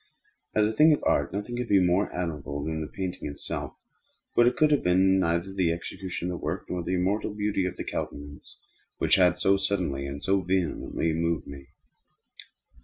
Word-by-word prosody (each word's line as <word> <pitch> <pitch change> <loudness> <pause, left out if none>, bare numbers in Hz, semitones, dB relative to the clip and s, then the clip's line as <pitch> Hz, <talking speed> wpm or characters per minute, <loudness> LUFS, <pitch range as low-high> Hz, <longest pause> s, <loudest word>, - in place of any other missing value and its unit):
As 105 -1 +4
a 110 - -2
thing 155 +6 +6
of - - -2
art - - +2
nothing 105 +5 -4
could 125 -1 -2
be 100 -3 +5
more 90 +2 +2
admirable 75 -5 -4
than 80 +1 -3
the 80 - -4
painting 90 -2 -5
itself. 70 - -5 0.6
But 120 - +6
it 125 - +1
could 155 -1 +4
have 145 - +3
been 95 +2 +4
neither 85 +1 0
the 90 -4 +1
execution 90 +1 -4
of 90 - -4
the - - -15
work, 80 +5 -3
nor 90 - -2
the 90 +2 -1
immortal 100 +3 0
beauty 105 -3 0
of - - -6
the - - -4
countenance, 70 0 -6 0.4
which - - 0
had 90 -2 +4
so 95 +2 +3
suddenly 90 -9 -1
and 70 +1 -7
so 95 0 +2
vehemently 90 -2 -1
moved 85 0 -1
me. 70 -1 -10
90 Hz, 190 wpm, -27 LUFS, 85-100 Hz, 0.6 s, thing